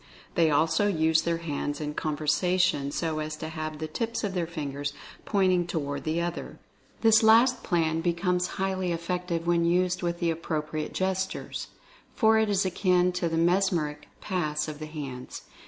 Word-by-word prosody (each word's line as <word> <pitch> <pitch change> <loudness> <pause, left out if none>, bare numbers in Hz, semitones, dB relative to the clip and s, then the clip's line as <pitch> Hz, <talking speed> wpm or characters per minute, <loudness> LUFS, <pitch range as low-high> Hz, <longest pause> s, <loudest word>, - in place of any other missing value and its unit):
They 165 -2 +3
also 160 +6 +3
use 160 -4 +3
their 170 -1 0
hands 145 -3 -3
in 150 -1 -3
con 150 -1 -2
versation 170 -1 +1
so 160 0 -2
as 155 0 -3
to 160 +1 -6
have 155 -1 -5
the 155 +1 -4
tips 230 +9 -3
of 200 -2 -1
their 175 -3 -1
fingers 145 -3 -4 0.3
point 195 -3 +2
ing 175 -1 +1
toward 145 -4 -3
the 160 +2 0
other. 175 0 -4 0.4
This 225 -1 +6
last 230 +3 +5
plan 165 -3 +1
becomes 180 +1 0
highly 190 -1 -1
effective 170 0 -2
when 170 0 +2
used 180 +1 +2
with 170 -1 -1
the 170 -1 +1
appropriate 155 -1 -3
gestures, 190 0 -2 0.5
for 220 -1 +4
it 220 -1 +2
is 200 -1 +2
akin 180 -1 +2
to 180 -1 -1
the 165 - -1
mesmeric 165 -4 +1
"pass" 155 -5 -1
of 150 -1 -6
the 155 - -6
hands. 140 -5 -7
170 Hz, 170 wpm, -27 LUFS, 155-185 Hz, 0.5 s, This